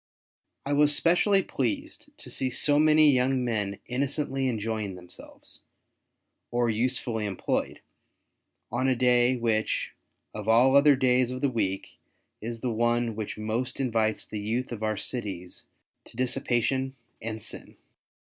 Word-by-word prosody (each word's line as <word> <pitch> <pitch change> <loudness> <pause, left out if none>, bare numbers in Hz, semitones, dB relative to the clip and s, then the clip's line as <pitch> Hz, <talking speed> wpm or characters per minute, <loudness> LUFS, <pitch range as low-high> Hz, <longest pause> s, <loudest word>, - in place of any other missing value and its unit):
I 140 - 0
was 150 0 +4
specially 190 +3 +3
pleased 300 +1 -3
to 300 - -9
see 130 - -2
so 145 +4 +2
many 155 -1 +6
young 130 0 +1
men 105 -4 -1
innocently 135 +1 -1
enjoying 110 -4 -2
themselves, 90 0 -10 0.9
or 120 -1 +1
usefully 115 -1 -1
employed, 95 - -2 0.9
on 125 +3 0
a 130 - +3
day, 125 +1 +3
which, 115 -3 0 0.4
of 105 0 -6
all 125 +4 +5
other 140 0 +7
days 125 -1 +2
of 130 0 -5
the 140 - +1
week, 95 -5 -2 0.4
is 115 +1 -5
the 125 - -1
one 120 0 +1
which 110 -1 -5
most 115 +5 -3
invites 110 -4 0
the 105 - -6
youth 115 +5 -2
of 115 -3 -5
our 110 -1 -1
cities 95 -8 -5 0.4
to - - -16
dissipation 130 +1 0 0.3
and 110 -1 -5
sin. - - -10
120 Hz, 135 wpm, -27 LUFS, 110-130 Hz, 0.9 s, other